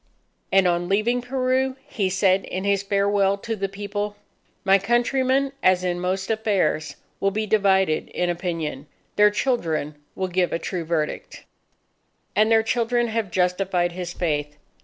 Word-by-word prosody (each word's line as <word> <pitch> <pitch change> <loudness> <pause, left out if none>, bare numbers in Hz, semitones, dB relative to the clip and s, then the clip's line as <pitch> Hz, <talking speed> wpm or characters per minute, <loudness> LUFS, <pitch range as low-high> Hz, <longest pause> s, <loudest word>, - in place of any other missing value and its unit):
And 190 -1 +5
on 175 0 0
leaving 225 +5 +1
Peru, 260 +1 0
he 195 -3 -1
said 190 0 +2
in 185 - -4
his 200 -1 +1
farewell 200 0 +1
to 225 +3 -4
the 195 -1 -3
People, 205 +1 -4 0.5
"My 195 0 +5
countrymen, 260 +5 +1
as 185 -1 +3
in 175 -1 -1
most 190 +3 -2
affairs, 205 -8 0 0.2
will 195 - +2
be 215 +2 -2
divided 190 -5 +2
in 180 - -1
opinion 165 -5 -3 0.3
their 210 0 +6
children 170 - -1 0.2
will 190 - -2
give 180 -1 0
a - - 0
true 170 0 -4
verdict." 155 -2 -3 0.9
And 215 +3 +3
their 225 0 +5
children 240 +1 +1
have 220 -3 -2
justified 180 0 0
his 175 0 -5
faith. 150 -4 -2
195 Hz, 150 wpm, -23 LUFS, 180-220 Hz, 0.9 s, their